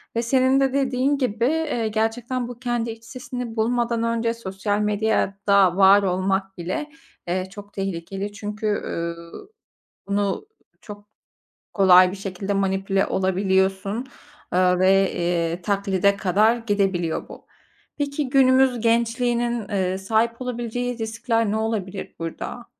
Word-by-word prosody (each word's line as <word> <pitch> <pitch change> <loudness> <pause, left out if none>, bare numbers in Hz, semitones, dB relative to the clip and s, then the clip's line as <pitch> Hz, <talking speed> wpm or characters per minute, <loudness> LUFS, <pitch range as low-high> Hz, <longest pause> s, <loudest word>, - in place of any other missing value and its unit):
Ve 230 - +1
senin 260 +2 +3
de, 270 -1 +1
dediğin 270 +1 +1
gibi, 235 -3 0 0.3
iii, 225 -2 -1
gerçekten 235 +3 -1
bu 245 -1 -9
kendi 240 -2 -2
iç 225 0 -11
sesini 250 -3 -6
bulmadan 235 +1 0
önce 230 0 0
sosyal 205 -1 -3
medyada 200 -3 +2
var 200 +1 +6
olmak 190 +1 -1
bile, 185 - -4 0.4
ııı, 185 +1 -1
çok 205 +1 -12
tehlikeli. 195 +1 -4
Çünkü, 210 +1 -6
üüü, 170 -4 -3 0.8
bunu 200 - -1 0.3
çok 205 -1 -11 0.7
kolay 185 -2 +6
bir 195 - -7
şekilde 195 +1 -4
manipüle 195 0 0
olabiliyorsun, 190 +4 0 0.5
eee, 180 0 +3
ve, 195 +1 +4 0.4
ııı, 175 +2 -5
taklide 200 0 +1
kadar 210 +5 +3
gidebiliyor 195 -7 -1
bu. - - -12 0.5
Peki, 285 -1 -2
günümüz 260 -2 +4
gençliğinin, 235 0 0
ııı, 190 -2 -1
sahip 225 +4 0
olabileceği 245 0 -3
riskler 225 0 -1
ne 215 - 0
olabilir 205 -4 -3
burada? 165 0 -6
210 Hz, 125 wpm, -23 LUFS, 195-235 Hz, 0.8 s, var